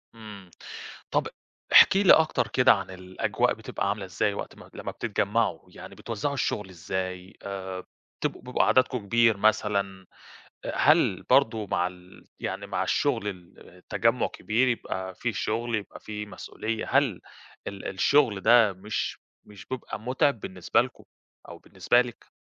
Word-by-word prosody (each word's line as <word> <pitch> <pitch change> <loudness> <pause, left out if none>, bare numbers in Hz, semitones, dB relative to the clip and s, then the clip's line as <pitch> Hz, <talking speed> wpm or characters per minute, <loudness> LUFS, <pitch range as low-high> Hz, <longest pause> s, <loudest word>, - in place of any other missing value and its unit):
إمم. 105 -5 -11 0.6
طَب - - +1 0.5
احكي 195 +1 +8
لي 185 - +8
أكتر 160 -1 +3
كده 125 - +5
عن 95 -2 -4
الأجواء 95 0 -1
بتبقى 100 - -3
عاملة 100 -1 -2
إزاي 95 +3 -1
وقت - - -6
ما - - -14
لمّا - - -6
بتتجمعوا، 110 +3 0
يعني - - -11
بتوزّعوا 115 +5 -3
الشُغل 105 -7 -2
إزاي؟ 95 +1 -5
آآ 95 -2 -5 0.4
بتبقوا - - -2
بيبقى 125 0 +1
عددكم 130 0 +3
كبير 115 0 +3
مثلًا؟ 100 -2 +1 0.6
آآ - - -4
هل - - +4
برضه 110 -2 +2
مع 90 -1 0
ال 90 0 -12
يعني - - -4
مع - - -2
الشُغل 115 -8 0 0.3
التجمّع 115 +6 -1
كبير، 120 +4 0
يبقى 95 -6 -3
في 115 +5 -2
شُغل، 115 +3 -2
يبقى 105 -2 -4
في 105 -1 -6
مسؤولية؛ 110 +1 -5
هل 130 -8 +2 0.5
ال 100 -1 -7
الشُغل 105 +1 +2
ده 115 -1 +5
مش 100 +3 -4 0.3
مش 100 -3 -14
بيبقى 130 -4 -6
مُتعب 130 +1 +1
بالنسبة 90 -2 0
لكم - - -10 0.4
أو - - -9
بالنسبة 120 - +2
لِك؟ 120 -2 -11
105 Hz, 145 wpm, -27 LUFS, 95-120 Hz, 0.6 s, احكي